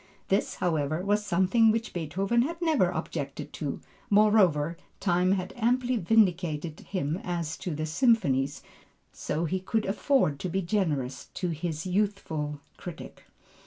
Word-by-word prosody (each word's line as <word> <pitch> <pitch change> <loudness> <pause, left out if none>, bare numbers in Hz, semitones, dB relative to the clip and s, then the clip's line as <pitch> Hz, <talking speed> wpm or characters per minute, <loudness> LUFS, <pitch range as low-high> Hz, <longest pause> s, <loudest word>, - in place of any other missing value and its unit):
This, 195 +2 +1
however, 155 -1 0
was 205 +1 +2
something 205 +5 +3
which 225 +1 -2
Beethoven 190 +8 0
had 330 +7 -2
never 310 - +3
objected 155 -5 -5
to; 145 -3 -4 0.3
moreover, 195 -7 +4 0.2
time 180 0 +2
had 185 -1 -3
amply 245 +2 +1
vindicated 175 -7 +1
him 170 -2 -3
as 170 -3 -2
to 175 -4 -4
the 155 +1 -2
symphonies, 155 - +2 0.5
so 155 +3 -2
he 185 +4 -1
could 210 +4 -1
afford 195 - +1
to 185 - -3
be 190 +2 -1
generous 150 -10 -1
to 180 - -2
his 160 0 -3
youthful 180 -7 -1 0.2
critic. 175 -3 -9
180 Hz, 135 wpm, -28 LUFS, 155-210 Hz, 0.5 s, moreover